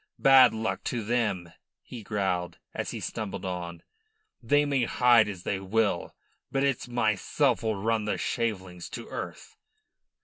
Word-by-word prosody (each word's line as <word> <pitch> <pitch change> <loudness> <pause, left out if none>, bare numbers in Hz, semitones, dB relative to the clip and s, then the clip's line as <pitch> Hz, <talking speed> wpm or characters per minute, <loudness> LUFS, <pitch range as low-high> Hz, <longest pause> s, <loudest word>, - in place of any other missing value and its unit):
"Bad 135 -1 +7
luck 110 0 -3
to 120 -3 -2
them!" 105 -7 -1 0.3
he 120 - -9
growled, 95 -4 -2 0.2
as - - -3
he - - -5
stumbled 100 -3 -5
on. 85 -2 -5 0.6
"They 145 +5 +3
may 140 -4 +1
hide 120 -4 +4
as 95 -3 -7
they 95 - -1
will, 100 -2 0 0.4
but 135 0 +1
it's 140 -3 0
myself 120 +3 +1
'll 110 -1 0
run 110 +2 0
the 105 - -1
shavelings 95 -7 -3
to 115 - -9
earth." - - -7
110 Hz, 145 wpm, -28 LUFS, 95-120 Hz, 0.6 s, Bad